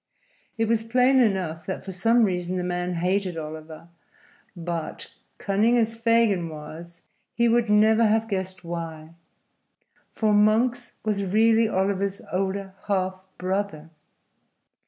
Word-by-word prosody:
It 225 Hz, 0 st, +1 dB
was 225 Hz, 0 st, +2 dB
plain 250 Hz, +4 st, +3 dB
enough 190 Hz, -8 st, 0 dB
that 190 Hz, -, -4 dB
for 195 Hz, -, -5 dB
some 225 Hz, +6 st, +3 dB
reason 180 Hz, -2 st, -1 dB
the 180 Hz, -, -2 dB
man 180 Hz, 0 st, -2 dB
hated 180 Hz, +1 st, -1 dB
Oliver, 155 Hz, +1 st, -8 dB, 0.7 s
but, 170 Hz, -2 st, -5 dB, 0.2 s
cunning 215 Hz, +5 st, +2 dB
as 225 Hz, -1 st, +1 dB
Fagin 230 Hz, -6 st, +2 dB
was, 160 Hz, +2 st, -10 dB, 0.3 s
he 235 Hz, 0 st, +3 dB
would 235 Hz, -1 st, +2 dB
never 220 Hz, +2 st, +5 dB
have 220 Hz, +1 st, +1 dB
guessed 190 Hz, -3 st, -4 dB
why. 165 Hz, -2 st, -6 dB, 1.0 s
For 215 Hz, -2 st, +1 dB
Monks 230 Hz, +4 st, +2 dB
was 205 Hz, -2 st, 0 dB
really 220 Hz, +3 st, +3 dB
Oliver's 195 Hz, 0 st, -1 dB
older 195 Hz, +1 st, -2 dB
half 185 Hz, -2 st, -1 dB
brother! 185 Hz, -4 st, -3 dB
195 Hz, 125 wpm, -25 LUFS, 175-225 Hz, 1.0 s, never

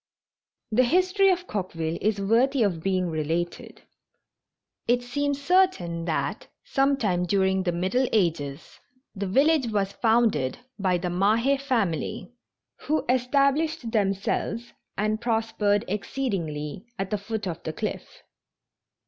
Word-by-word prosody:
The 245 Hz, +4 st, +4 dB
history 370 Hz, +6 st, +3 dB
of 360 Hz, -1 st, +1 dB
Coqueville 170 Hz, -, -3 dB
is 210 Hz, 0 st, +1 dB
worthy 235 Hz, +6 st, +3 dB
of 180 Hz, -6 st, 0 dB
being 185 Hz, -1 st, 0 dB
related. 160 Hz, +3 st, -3 dB, 1.0 s
It 245 Hz, +1 st, +2 dB
seems 285 Hz, +3 st, -1 dB
certain 280 Hz, -, +2 dB
that, 165 Hz, -, -2 dB, 0.2 s
some 275 Hz, +1 st, +2 dB
time 180 Hz, -7 st, 0 dB
during 190 Hz, 0 st, +2 dB
the 180 Hz, -2 st, 0 dB
Middle 190 Hz, +10 st, +1 dB
Ages, 160 Hz, -8 st, -1 dB, 0.3 s
the 200 Hz, -1 st, -3 dB
village 275 Hz, +6 st, +3 dB
was 200 Hz, -3 st, 0 dB
founded 220 Hz, -, +2 dB, 0.2 s
by 185 Hz, -2 st, +2 dB
the 175 Hz, 0 st, -3 dB
Mahe 220 Hz, +9 st, +3 dB
family 240 Hz, -, -2 dB, 0.5 s
who 310 Hz, +1 st, +1 dB
estab 275 Hz, +3 st, +2 dB
lished 315 Hz, -7 st, -3 dB
themselves 210 Hz, +3 st, -1 dB, 0.2 s
and 215 Hz, +2 st, 0 dB
prospered 225 Hz, -2 st, +1 dB
exceedingly 190 Hz, -, -3 dB
at 195 Hz, 0 st, -3 dB
the 210 Hz, -, 0 dB
foot 210 Hz, +1 st, -4 dB
of 170 Hz, -2 st, -4 dB
the 160 Hz, -, -4 dB
cliff. -, -, -6 dB
210 Hz, 125 wpm, -26 LUFS, 180-255 Hz, 1.0 s, The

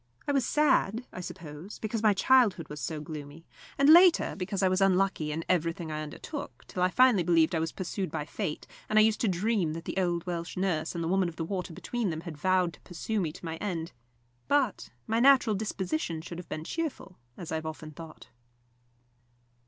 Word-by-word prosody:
I -, -, +2 dB
was 275 Hz, -4 st, +1 dB
sad, 255 Hz, -6 st, +2 dB
I 180 Hz, -, -6 dB
suppose, 170 Hz, +1 st, -8 dB
because 220 Hz, 0 st, -3 dB
my 215 Hz, -2 st, +4 dB
childhood 210 Hz, -, +3 dB
was 150 Hz, -1 st, -7 dB
so 155 Hz, +5 st, -3 dB
gloomy, 150 Hz, 0 st, -8 dB, 0.3 s
and, 275 Hz, -, +4 dB
later, 345 Hz, +3 st, +7 dB
because 195 Hz, +1 st, -2 dB
I -, -, +5 dB
was 185 Hz, +1 st, +1 dB
unlucky 190 Hz, -5 st, +2 dB
in 160 Hz, +2 st, -4 dB
everything 165 Hz, -2 st, 0 dB
I 155 Hz, 0 st, -3 dB
undertook, 155 Hz, -, -7 dB
till 180 Hz, -, -5 dB
I 180 Hz, -, +4 dB
finally 250 Hz, -2 st, +5 dB
believed 165 Hz, 0 st, +3 dB
I 165 Hz, -, +1 dB
was 160 Hz, 0 st, -1 dB
pursued 185 Hz, 0 st, -4 dB
by 145 Hz, -, -4 dB
fate, 165 Hz, 0 st, -4 dB, 0.2 s
and 215 Hz, -, +2 dB
I 215 Hz, -, +8 dB
used 220 Hz, 0 st, +2 dB
to 230 Hz, -, +2 dB
dream 190 Hz, -3 st, +1 dB
that 165 Hz, +1 st, -7 dB
the -, -, -5 dB
old 175 Hz, -2 st, 0 dB
Welsh 170 Hz, -1 st, -4 dB
nurse 175 Hz, -4 st, -1 dB
and 170 Hz, -, -2 dB
the -, -, -1 dB
Woman 185 Hz, 0 st, +2 dB
of 165 Hz, -, -11 dB
the 165 Hz, -, -3 dB
Water 180 Hz, -1 st, -4 dB
between 230 Hz, +5 st, -3 dB
them 160 Hz, -1 st, -4 dB
had 170 Hz, -2 st, -7 dB
vowed 180 Hz, +2 st, +1 dB
to -, -, -17 dB
pursue 200 Hz, +4 st, -3 dB
me 160 Hz, -4 st, -1 dB
to 165 Hz, -, -11 dB
my 165 Hz, 0 st, -4 dB
end. 170 Hz, -5 st, -3 dB, 0.6 s
But 260 Hz, -, +1 dB, 0.2 s
my 225 Hz, +1 st, 0 dB
natural 255 Hz, -4 st, +5 dB
disposition 190 Hz, -, -3 dB
should 170 Hz, 0 st, -7 dB
have 180 Hz, -, -10 dB
been 155 Hz, -, -4 dB
cheerful, 295 Hz, -, -5 dB, 0.2 s
as 170 Hz, -, -7 dB
I -, -, 0 dB
have 160 Hz, 0 st, -5 dB
often 155 Hz, 0 st, -7 dB
thought. 160 Hz, +1 st, -11 dB
180 Hz, 210 wpm, -29 LUFS, 160-215 Hz, 0.6 s, I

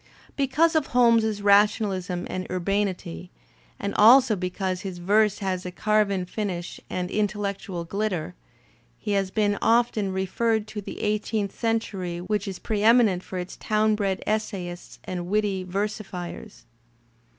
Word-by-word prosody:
Because 295 Hz, +5 st, +2 dB
of 310 Hz, -3 st, +2 dB
Holmes's 230 Hz, -4 st, +3 dB
rationalism 200 Hz, -3 st, +2 dB
and 185 Hz, 0 st, -5 dB
urbanity, 185 Hz, -, -2 dB, 0.5 s
and 200 Hz, -, -3 dB
also 240 Hz, +1 st, +7 dB
be 180 Hz, -1 st, -2 dB
cause 185 Hz, 0 st, -3 dB
his 190 Hz, -3 st, -6 dB
verse 205 Hz, +3 st, +2 dB
has 185 Hz, -1 st, -1 dB
a 180 Hz, -, -4 dB
carven 200 Hz, -1 st, +1 dB
finish 180 Hz, -3 st, -4 dB
and 180 Hz, 0 st, -3 dB
intellectual 200 Hz, -4 st, -2 dB
glitter, 190 Hz, -, -2 dB, 0.6 s
he -, -, -4 dB
has 195 Hz, -1 st, +1 dB
been 205 Hz, 0 st, +1 dB
often 225 Hz, -4 st, +2 dB
referred 210 Hz, +4 st, 0 dB
to 210 Hz, -1 st, -5 dB
the -, -, -8 dB
eighteenth 210 Hz, -1 st, -1 dB
century 205 Hz, -6 st, -2 dB
which 205 Hz, +4 st, -2 dB
is 190 Hz, -2 st, -4 dB
preeminent 215 Hz, -3 st, +3 dB
for 185 Hz, -, -7 dB
its 180 Hz, +1 st, -6 dB
town 215 Hz, 0 st, +1 dB
bred 195 Hz, -3 st, -1 dB
essayists 195 Hz, -5 st, -3 dB
and 175 Hz, -1 st, -5 dB
witty 200 Hz, -1 st, 0 dB
versifiers. 195 Hz, +1 st, -5 dB
200 Hz, 135 wpm, -25 LUFS, 185-215 Hz, 0.6 s, also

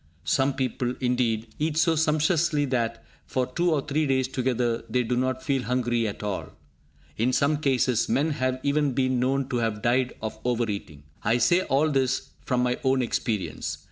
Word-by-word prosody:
Some 135 Hz, +1 st, +2 dB
people, 130 Hz, -1 st, -1 dB
indeed, 120 Hz, -3 st, 0 dB
eat 155 Hz, 0 st, 0 dB
so 160 Hz, 0 st, +3 dB
sumptuously 155 Hz, 0 st, +2 dB
that, 120 Hz, -4 st, -2 dB, 0.2 s
for 130 Hz, -1 st, 0 dB
two 170 Hz, +7 st, 0 dB
or 150 Hz, -3 st, +2 dB
three 150 Hz, +1 st, 0 dB
days 130 Hz, -1 st, +1 dB
together, 125 Hz, -3 st, -1 dB
they 125 Hz, +2 st, +1 dB
do 120 Hz, +1 st, -1 dB
not 130 Hz, +1 st, -1 dB
feel 135 Hz, -2 st, 0 dB
hungry 120 Hz, -1 st, 0 dB
at 105 Hz, -, -6 dB
all. 105 Hz, -2 st, -3 dB, 0.7 s
In 120 Hz, +4 st, +2 dB
some 140 Hz, +3 st, +2 dB
cases, 130 Hz, -5 st, +1 dB
men 150 Hz, +4 st, +2 dB
have 130 Hz, -2 st, -1 dB
even 145 Hz, -1 st, +1 dB
been 130 Hz, -1 st, +1 dB
known 135 Hz, +1 st, +1 dB
to 125 Hz, -, -1 dB
have 110 Hz, -2 st, -1 dB
died 125 Hz, +1 st, +1 dB
of 110 Hz, 0 st, -5 dB
over 120 Hz, -1 st, 0 dB
eating. 80 Hz, -8 st, -6 dB, 0.2 s
I 115 Hz, +3 st, +2 dB
say 175 Hz, +10 st, +4 dB
all 150 Hz, -2 st, +1 dB
this 130 Hz, -2 st, 0 dB
from 125 Hz, -1 st, +1 dB
my 125 Hz, 0 st, 0 dB
own 130 Hz, -1 st, +2 dB
experience. 110 Hz, -3 st, -2 dB
130 Hz, 180 wpm, -26 LUFS, 120-140 Hz, 0.7 s, say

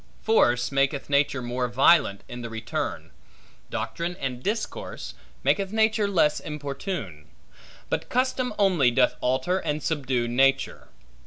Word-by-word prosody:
Force, 125 Hz, -, +3 dB
maketh 135 Hz, +1 st, 0 dB
nature 140 Hz, -2 st, +2 dB
more 125 Hz, +1 st, -1 dB
violent 130 Hz, -3 st, +4 dB
in 120 Hz, 0 st, -7 dB
the 115 Hz, -, -5 dB
return; 110 Hz, 0 st, -4 dB, 0.6 s
doctrine 170 Hz, +1 st, -3 dB
and 130 Hz, -5 st, -4 dB
discourse, 210 Hz, -, -4 dB, 0.3 s
maketh 195 Hz, -1 st, +1 dB
nature 220 Hz, -1 st, +2 dB
less 160 Hz, -6 st, +2 dB
importune; 140 Hz, -, -5 dB, 0.6 s
but -, -, -3 dB
custom 255 Hz, 0 st, 0 dB
only 180 Hz, -10 st, +4 dB
doth 125 Hz, +1 st, +2 dB
alter 130 Hz, +9 st, +1 dB
and 150 Hz, -3 st, -3 dB
subdue 130 Hz, -6 st, 0 dB
nature. 135 Hz, +3 st, +1 dB
140 Hz, 125 wpm, -25 LUFS, 125-185 Hz, 0.6 s, violent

